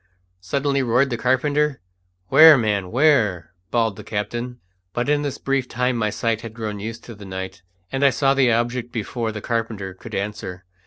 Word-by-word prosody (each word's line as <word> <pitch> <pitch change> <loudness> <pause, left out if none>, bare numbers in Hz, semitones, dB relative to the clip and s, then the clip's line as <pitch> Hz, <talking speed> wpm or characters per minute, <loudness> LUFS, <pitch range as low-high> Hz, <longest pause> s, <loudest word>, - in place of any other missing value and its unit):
suddenly 140 +8 0
roared 125 +2 +2
the - - 0
carpenter. 140 +4 +1 0.5
"Where, 160 -1 +9
man, 105 -5 0
where?" 105 - +2 0.2
bawled 115 -3 0
the - - -9
captain. 120 +4 -4 0.3
But 120 +2 -1
in 145 0 +2
this 145 -2 -3
brief 135 -2 -1
time 125 +1 0
my 110 -2 0
sight 115 +1 -1
had 115 -1 -9
grown 105 -3 -4
used 115 +3 -6
to 120 - -9
the 105 -1 -12
night, 95 -1 -6 0.3
and 135 +1 -1
I 140 - +7
saw 135 +2 +2
the 135 -3 +3
object 120 +1 -1
before 115 0 -3
the 105 -1 -6
carpenter 110 -5 -3
could 95 - -9
answer. 100 -3 -5
115 Hz, 180 wpm, -22 LUFS, 105-130 Hz, 0.5 s, Where